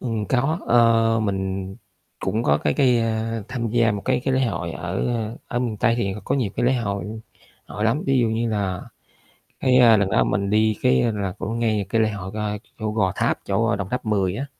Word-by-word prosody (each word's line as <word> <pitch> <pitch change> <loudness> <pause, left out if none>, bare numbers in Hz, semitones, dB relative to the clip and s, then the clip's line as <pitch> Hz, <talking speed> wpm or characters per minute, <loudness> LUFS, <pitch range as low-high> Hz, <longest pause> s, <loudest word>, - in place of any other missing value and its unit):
Ừm, 115 -4 -2
có, 135 +6 +1
ờ, 115 -1 +4
mình 95 -2 -2 0.5
cũng 110 - -1
có 75 -5 +3
cái 75 -1 0
cái, 125 -3 +3
a, 115 0 -1
tham 120 -2 -3
gia 115 -1 +3
một 100 -1 -4
cái 130 -1 +1
cái 135 - +1
lễ 130 - +2
hội 85 -7 -3
ở 90 +3 -3 0.4
ở 120 - -2
miền 120 -4 -2
Tây 115 +2 +2
thì 100 -5 -1
có - - 0
nhiều 125 -8 0
cái 120 - +1
lễ 130 - +4
hội 105 -1 -3 0.4
họ 105 - -6
lắm, 115 +7 +1
ví 135 -1 +3
dụ 115 - +2
như 115 +1 -1
là 100 -4 -1 0.8
cái, 130 -1 +3
a, 115 -3 +7
lần 100 -2 +1
đó - - +3
mình 100 +1 -1
đi 110 0 +2
cái 120 -2 +3
là 100 -3 -3
cũng 115 +4 -3
ngay 110 -4 0
cái 115 +3 +1
lễ 110 -1 +2
hội, 100 -2 -6
ơ, 105 -1 -2 0.2
chỗ 110 -2 -2
Gò 100 -4 +1
Tháp, - - +1
chỗ 110 +2 +1
Đồng 100 -1 -4
Tháp 125 0 -2
Mười 100 -4 +1
á. 135 - -3
110 Hz, 220 wpm, -23 LUFS, 100-120 Hz, 0.8 s, a